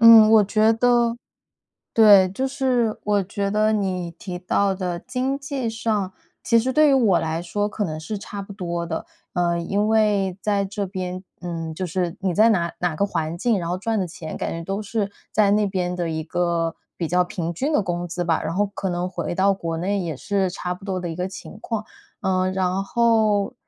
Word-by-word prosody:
嗯， 230 Hz, -2 st, +9 dB
我 215 Hz, -2 st, +7 dB
觉 215 Hz, +2 st, +3 dB
得 235 Hz, 0 st, +3 dB, 0.8 s
对， 205 Hz, -4 st, +7 dB
就 260 Hz, +8 st, -2 dB
是 255 Hz, -5 st, 0 dB
我 205 Hz, -1 st, +2 dB
觉 200 Hz, +1 st, -3 dB
得 215 Hz, +1 st, +2 dB
你 185 Hz, -4 st, -1 dB
提 180 Hz, +2 st, -7 dB
到 195 Hz, +2 st, +1 dB
的 180 Hz, -2 st, -3 dB
经 255 Hz, +5 st, -2 dB
济 275 Hz, -4 st, -3 dB
上， 215 Hz, -4 st, -1 dB, 0.3 s
其 230 Hz, -, +4 dB
实 255 Hz, +3 st, +1 dB
对 305 Hz, +3 st, +5 dB
于 -, -, +4 dB
我 220 Hz, -10 st, +4 dB
来 160 Hz, +1 st, -2 dB
说， 205 Hz, +4 st, -1 dB
可 210 Hz, +1 st, -3 dB
能 155 Hz, -5 st, -2 dB
是 205 Hz, +7 st, -5 dB
差 200 Hz, 0 st, -7 dB
不 200 Hz, -, -9 dB
多 175 Hz, -3 st, -3 dB
的。 160 Hz, -1 st, -4 dB, 0.3 s
呃， 175 Hz, -1 st, +1 dB
因 200 Hz, +5 st, 0 dB
为 205 Hz, -4 st, +2 dB
在 205 Hz, -1 st, +1 dB
这 200 Hz, +1 st, -3 dB
边， 185 Hz, -1 st, -5 dB, 0.2 s
嗯 165 Hz, -2 st, -4 dB
就 185 Hz, +3 st, -3 dB
是 175 Hz, -1 st, -2 dB
你 185 Hz, -3 st, 0 dB
在 220 Hz, +4 st, +5 dB
哪 170 Hz, -5 st, +1 dB
哪 175 Hz, -2 st, 0 dB
个 200 Hz, +6 st, +1 dB
环 165 Hz, -2 st, -3 dB
境， 230 Hz, +1 st, +2 dB
然 170 Hz, -, -3 dB
后 180 Hz, -, -1 dB
赚 220 Hz, +2 st, -1 dB
的 185 Hz, -, 0 dB
钱 160 Hz, -1 st, -7 dB
感 -, -, -3 dB
觉 165 Hz, 0 st, -4 dB
都 195 Hz, +4 st, -3 dB
是 205 Hz, -1 st, -2 dB, 0.2 s
在 210 Hz, -2 st, +4 dB
那 210 Hz, 0 st, +3 dB
边 180 Hz, -2 st, -2 dB
的 170 Hz, -2 st, -2 dB
一 160 Hz, 0 st, -2 dB
个 170 Hz, 0 st, -1 dB, 0.2 s
比 170 Hz, -, -1 dB
较 180 Hz, +2 st, +3 dB
平 175 Hz, -2 st, -4 dB
均 275 Hz, -, -1 dB
的 295 Hz, -, +4 dB
工 175 Hz, -1 st, -2 dB
资 175 Hz, +1 st, -3 dB
吧。 165 Hz, -2 st, +1 dB
然 -, -, -2 dB
后 205 Hz, +2 st, +2 dB
可 190 Hz, -2 st, -2 dB
能 175 Hz, +1 st, -1 dB
回 175 Hz, -1 st, -4 dB
到 195 Hz, +2 st, +3 dB
国 165 Hz, -3 st, -4 dB
内 200 Hz, +4 st, 0 dB
也 170 Hz, -4 st, -3 dB
是 190 Hz, +6 st, -1 dB
差 180 Hz, 0 st, -3 dB
不 185 Hz, -, -14 dB
多 190 Hz, -2 st, -2 dB
的 175 Hz, -, -4 dB
一 165 Hz, -, -5 dB
个 180 Hz, +1 st, -1 dB
情 195 Hz, +2 st, -9 dB
况。 220 Hz, -2 st, -3 dB, 0.4 s
呃 185 Hz, 0 st, +1 dB
然 185 Hz, 0 st, 0 dB
后 220 Hz, -3 st, +2 dB
195 Hz, 230 characters per minute, -23 LUFS, 175-215 Hz, 0.8 s, 嗯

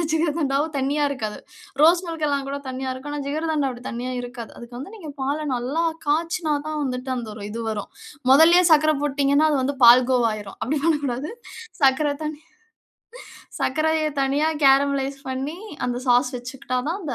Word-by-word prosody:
எந்த 335 Hz, -, 0 dB
ஜிகர்தண்டாவும் 310 Hz, -2 st, 0 dB
தண்ணியா 285 Hz, +3 st, 0 dB
இருக்காது. 220 Hz, -6 st, -4 dB, 0.4 s
ரோஸ் 340 Hz, +3 st, +6 dB
மில்க் 325 Hz, -2 st, -3 dB
எல்லாம் 280 Hz, -1 st, -1 dB
கூட 280 Hz, -, -3 dB
தண்ணியா 260 Hz, 0 st, -4 dB
இருக்கும். 290 Hz, +3 st, -7 dB
ஆனா 290 Hz, -, -3 dB
ஜிகர்தண்டா 305 Hz, -1 st, -1 dB
அப்படி 245 Hz, 0 st, -9 dB
தண்ணியா 245 Hz, +2 st, -4 dB
இருக்காது. 240 Hz, -3 st, -8 dB
அதுக்கு 240 Hz, 0 st, -10 dB
வந்து 335 Hz, +11 st, -8 dB
நீங்க 320 Hz, -7 st, -8 dB
பால 280 Hz, +3 st, -1 dB, 0.2 s
நல்லா 270 Hz, +8 st, -1 dB, 0.2 s
காய்ச்சினா 320 Hz, +1 st, 0 dB
தான் 310 Hz, 0 st, -3 dB
வந்துட்டு 255 Hz, 0 st, -3 dB
அந்த 235 Hz, -3 st, -5 dB
ஒரு 205 Hz, -2 st, -8 dB
இது 230 Hz, +2 st, -5 dB
வரும். 210 Hz, -2 st, -4 dB, 0.4 s
மொதல்லயே 335 Hz, +5 st, +7 dB
சர்க்கரை 310 Hz, 0 st, +5 dB
போட்டுட்டீங்கன்னா 285 Hz, +1 st, +2 dB
அது 290 Hz, -, +1 dB
வந்து 275 Hz, +1 st, -2 dB
பால் 245 Hz, +2 st, +8 dB
கோவாகிரும். 215 Hz, -5 st, 0 dB
அப்டி 290 Hz, +4 st, -1 dB
பண்ணக்கூடாது. 290 Hz, -2 st, 0 dB, 0.5 s
சர்க்கரை 280 Hz, +2 st, +3 dB
தண்ணி 305 Hz, 0 st, -5 dB, 1.2 s
சர்க்கரையை 310 Hz, +2 st, +1 dB
தனியா 285 Hz, +4 st, +1 dB, 0.2 s
கேரமலைஸ் 275 Hz, 0 st, +3 dB
பண்ணி 275 Hz, +6 st, -4 dB, 0.3 s
அந்த 245 Hz, -1 st, -2 dB
சாஸ் 245 Hz, +1 st, +3 dB
வச்சுக்கிட்டா 255 Hz, +1 st, -4 dB
தான் 375 Hz, -, -2 dB
அந்த 285 Hz, -5 st, -3 dB
280 Hz, 165 wpm, -23 LUFS, 255-310 Hz, 1.2 s, பால்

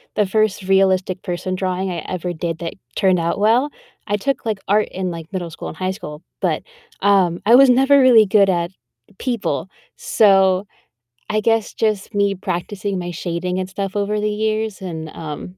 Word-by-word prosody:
the 210 Hz, -, +2 dB
first 210 Hz, 0 st, 0 dB
realistic 190 Hz, -1 st, +2 dB
person 185 Hz, 0 st, -3 dB
drawing 185 Hz, 0 st, -2 dB
I 170 Hz, -, -3 dB
ever 180 Hz, -1 st, -3 dB
did 165 Hz, 0 st, -3 dB
that 170 Hz, -1 st, -4 dB, 0.2 s
turned 185 Hz, -2 st, +3 dB
out 170 Hz, +3 st, -1 dB
well. 235 Hz, +7 st, +3 dB, 0.4 s
I 205 Hz, +1 st, 0 dB
took, 270 Hz, +3 st, -2 dB
like, 215 Hz, -3 st, -1 dB
art 210 Hz, +2 st, +2 dB
in, 185 Hz, -1 st, -3 dB
like, 165 Hz, 0 st, -8 dB
middle 175 Hz, -3 st, -3 dB
school -, -, -8 dB
and -, -, -10 dB
high 185 Hz, 0 st, -1 dB
school, 150 Hz, -6 st, -8 dB, 0.2 s
but, -, -, 0 dB, 0.4 s
um, 190 Hz, -4 st, +3 dB
I 235 Hz, +3 st, +7 dB
was 270 Hz, 0 st, +7 dB
never 270 Hz, +3 st, +5 dB
really 245 Hz, -4 st, +7 dB
good 200 Hz, -1 st, +4 dB
at 175 Hz, 0 st, 0 dB, 0.5 s
people. 225 Hz, -, -2 dB, 0.3 s
So, 195 Hz, -2 st, +3 dB, 0.6 s
I 215 Hz, 0 st, +1 dB
guess 225 Hz, -1 st, +1 dB
just 215 Hz, -1 st, -1 dB
me 200 Hz, -1 st, +2 dB
practicing 190 Hz, +1 st, -3 dB
my 175 Hz, 0 st, -4 dB
shading 175 Hz, +2 st, -3 dB
and 185 Hz, -, -4 dB
stuff 195 Hz, +1 st, -4 dB
over 205 Hz, +1 st, 0 dB
the 210 Hz, 0 st, 0 dB
years 215 Hz, -1 st, -2 dB
and, 160 Hz, -4 st, -6 dB
um, 160 Hz, +4 st, -8 dB
190 Hz, 180 wpm, -20 LUFS, 180-215 Hz, 0.6 s, I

